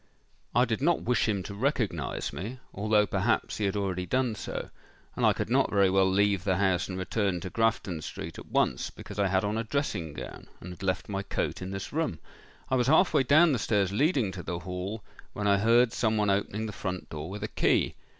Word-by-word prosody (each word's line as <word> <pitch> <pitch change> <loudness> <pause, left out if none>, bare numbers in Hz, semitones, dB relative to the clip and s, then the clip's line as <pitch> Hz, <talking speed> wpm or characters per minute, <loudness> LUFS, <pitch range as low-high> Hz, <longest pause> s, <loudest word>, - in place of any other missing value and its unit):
I 125 - +5
did 115 0 -2
not 170 +3 +2
wish 120 -2 +1
him 100 -3 0
to 100 - -7
recognise 105 - -1
me—although 105 -1 -1
perhaps - - 0
he 105 - 0
had 100 - 0
already 95 -3 -2
done 130 -3 +1
so; 105 - -6 0.4
and - - -2
I - - +6
could - - -3
not - - +3
very 100 -2 +3
well 95 0 +4
leave 100 -1 +2
the 95 -2 +1
house 95 -2 +1
and 95 - -4
return 95 -1 -1
to 90 0 -6
Grafton 115 -7 0
street 80 +1 -7
at - - -11
once, - - +1
because 105 0 -9
I 100 - +3
had 95 +1 +1
on 105 +2 -1
a - - -1
dressing 105 - -2
gown, - - -8
and 90 - -8
had 90 - -11
left 95 -1 -1
my 100 -1 -2
coat 100 - -3
in 95 - -5
this 95 +5 -6
room. 155 - -1 0.5
I 130 - +1
was 125 -1 +1
half 160 +6 +5
way 150 - +5
down 150 +6 +5
the 130 - +1
stairs 100 -3 +1
leading 130 - +2
to 95 - -7
the 85 0 -4
hall, 90 +4 -5 0.3
when 105 - -3
I 100 -1 +4
heard 115 +3 +4
some 110 -2 +1
one 105 -1 +2
opening 100 +2 -1
the 110 - -4
front 95 -3 -5
door 80 +2 -5
with 105 +2 -6
a - - -1
key. - - +1
100 Hz, 225 wpm, -28 LUFS, 95-115 Hz, 0.5 s, I